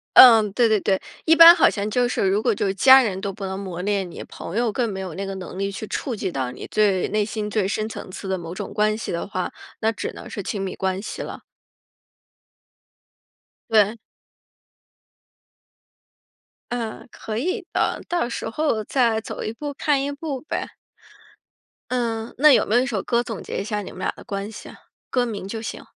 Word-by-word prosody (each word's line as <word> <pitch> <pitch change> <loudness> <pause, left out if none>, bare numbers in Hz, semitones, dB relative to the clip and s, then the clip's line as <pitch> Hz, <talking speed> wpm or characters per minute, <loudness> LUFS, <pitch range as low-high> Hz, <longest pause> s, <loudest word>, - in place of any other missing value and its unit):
嗯， 225 -5 +9
对 235 +4 +3
对 220 -1 +3
对。 190 -1 +1 0.3
一 325 - +6
般 335 +1 +11
好 335 - +5
像 205 0 -3
就 245 +3 +2
是 200 - 0
如 195 +3 +2
果 235 - +3
就 205 - -1
是 195 - 0
家 260 +6 +8
人 195 -6 -1
都 200 - -2
不 195 0 -7
能 190 0 -4
磨 185 -3 -5
练 195 -2 -1
你， - - -9
朋 200 - -7
友 235 -1 +2
更 235 +1 -1
没 190 - -5
有 185 -3 -5
那 195 +4 -4
个 195 - -4
能 185 0 -8
力 195 0 -1
去 210 +2 -6
触 260 - -3
及 195 - -3
到 130 -5 -2
你 - - -9
最 200 -3 +2
内 210 0 +1
心 210 0 -4
最 210 -2 0
深 215 +2 -1
层 190 - -8
次 195 - -7
的 190 0 -1
某 170 -1 -7
种 190 - -6
关 215 0 +1
系 - - -5
的 170 - -2
话， 185 -2 -3 0.3
那 220 - +2
只 - - -5
能 - - -10
是 200 - -5
亲 200 +1 -3
密 190 -1 -4
关 190 0 -2
系 215 - -6
了。 - - -7 2.3
对。 215 +1 +4 2.7
嗯， 230 -2 -4
可 220 0 -6
以 370 - -2
的。 - - 0
到 345 -9 0
时 235 - -4
候 260 -3 0
再 235 -4 +2
走 - - -6
一 - - -3
步 285 +5 -6
看 285 -1 +1
一 280 - -2
步 285 -1 -4
呗。 310 - -4 1.2
嗯， 230 -2 -2
那 300 +1 +7
有 - - +4
没 220 - 0
有 245 - +5
一 260 - 0
首 220 -6 -2
歌 240 -1 +1
总 225 -4 -6
结 - - -4
一 - - -3
下 210 -1 -2
你 200 - -8
们 185 - -11
俩 - - -1
的 - - -12
关 200 +1 -4
系 220 - -10
啊， - - -12 0.3
歌 250 -1 +1
名 210 -5 -5
就 220 +3 -5
行。 - - -6
215 Hz, 225 characters per minute, -23 LUFS, 195-245 Hz, 2.7 s, 般